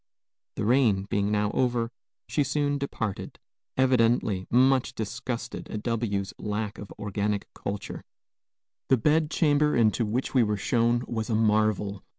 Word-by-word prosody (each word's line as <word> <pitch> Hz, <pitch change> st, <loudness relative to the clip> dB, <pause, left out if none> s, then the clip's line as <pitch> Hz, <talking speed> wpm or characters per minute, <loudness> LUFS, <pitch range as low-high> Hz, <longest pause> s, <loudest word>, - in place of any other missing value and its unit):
The -, -, -2 dB
rain 115 Hz, -5 st, +3 dB
being 100 Hz, 0 st, +1 dB
now 105 Hz, 0 st, +1 dB
over, 120 Hz, -2 st, 0 dB, 0.4 s
she 145 Hz, -, +1 dB
soon 145 Hz, +1 st, 0 dB
departed, 110 Hz, -7 st, -4 dB, 0.4 s
evidently 115 Hz, -7 st, +2 dB
much 130 Hz, 0 st, +3 dB
disgusted 115 Hz, +2 st, -5 dB
at 105 Hz, -, -5 dB
W 115 Hz, -4 st, -1 dB
's -, -, -10 dB
lack 105 Hz, 0 st, -3 dB
of 100 Hz, -, -9 dB
organic 105 Hz, 0 st, -2 dB
culture. 100 Hz, 0 st, -5 dB, 0.8 s
The 130 Hz, -, +4 dB
bed 150 Hz, +5 st, +2 dB
chamber 150 Hz, -2 st, +2 dB
into 115 Hz, 0 st, +3 dB
which 115 Hz, +5 st, -2 dB
we 130 Hz, -, +5 dB
were 105 Hz, -2 st, +1 dB
shown 120 Hz, +2 st, +1 dB
was 110 Hz, -1 st, -3 dB
a 110 Hz, -, +1 dB
marvel. 105 Hz, -2 st, +1 dB
115 Hz, 145 wpm, -27 LUFS, 105-130 Hz, 0.8 s, we